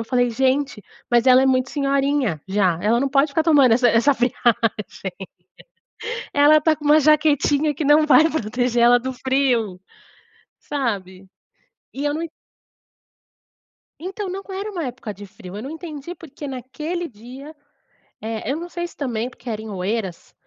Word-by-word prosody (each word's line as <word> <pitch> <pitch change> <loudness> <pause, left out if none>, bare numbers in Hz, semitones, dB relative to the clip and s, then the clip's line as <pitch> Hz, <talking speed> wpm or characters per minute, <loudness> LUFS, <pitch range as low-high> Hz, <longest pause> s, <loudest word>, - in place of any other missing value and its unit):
eu - - -4
falei: 245 0 +1
"Gente, 265 -1 0 0.3
mas 240 +1 +3
ela 255 0 +7
é - - +3
muito 260 0 +1
senhorinha 275 - 0
já. 190 -4 +1
Ela 220 +3 +2
não 275 - +1
pode 275 +2 +3
ficar 305 +3 0
tomando 290 -7 +5
essa 245 +1 +4
essa 235 +5 +3
friagem. 245 -1 0 2.0
Ela 295 +2 +5
tá 310 +1 +2
com 300 - -13
uma 300 +1 +5
jaquetinha 300 0 +3
que 305 - -3
não 300 +2 +5
vai 305 +3 +6
proteger 245 -2 0
ela 245 +1 +6
do 260 +2 -4
frio", 245 -7 0 0.8
sabe? 195 -9 -4 0.7
E 280 - -5
eu 290 0 0
não 320 - -3
e 335 - -5 1.7
Entao, 385 +3 -5
não 385 +2 -5
era 395 +2 -4
uma 350 -5 -4
época 245 -4 -6
de 205 +2 -11
frio. 185 0 -11
Eu 215 - -6
não 270 - -6
entendi 320 0 -7
porque 300 -4 -10
naquele 300 +7 -5
dia, 260 +7 -12 0.6
eh, 220 +2 -4
eu 285 - -2
não 345 +2 -7
sei 345 0 -4
se - - -19
também 245 -4 -2
porque 250 -1 -11
era 215 -1 -3
em 220 - -8
Oeiras. 190 -1 -4
265 Hz, 165 wpm, -21 LUFS, 230-300 Hz, 2.0 s, ela